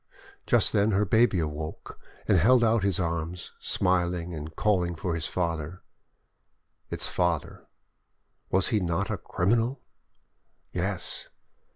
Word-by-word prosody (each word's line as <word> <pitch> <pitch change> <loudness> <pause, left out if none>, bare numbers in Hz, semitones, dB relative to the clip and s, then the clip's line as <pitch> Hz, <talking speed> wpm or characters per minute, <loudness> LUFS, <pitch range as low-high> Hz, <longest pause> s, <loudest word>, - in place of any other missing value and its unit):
Just - - +3
then 105 +1 +3
her 100 +2 +2
baby 110 0 +3
awoke, 75 -1 -5 0.3
and 105 - +4
held 120 +7 +5
out 115 -2 +3
its 100 -3 +1
arms, 85 0 -3
smiling, 90 -1 0
and 80 0 -7
calling 90 -5 +1
for 85 +1 -3
its 80 -1 -2
father. 85 -1 -3 1.1
Its - - +1
father, 85 -3 -2 0.8
was 95 0 +3
he 110 -4 +2
not 85 -3 -1
a - - -1
criminal? 115 +8 0 0.9
Yes! - - -2
90 Hz, 125 wpm, -27 LUFS, 85-105 Hz, 1.1 s, held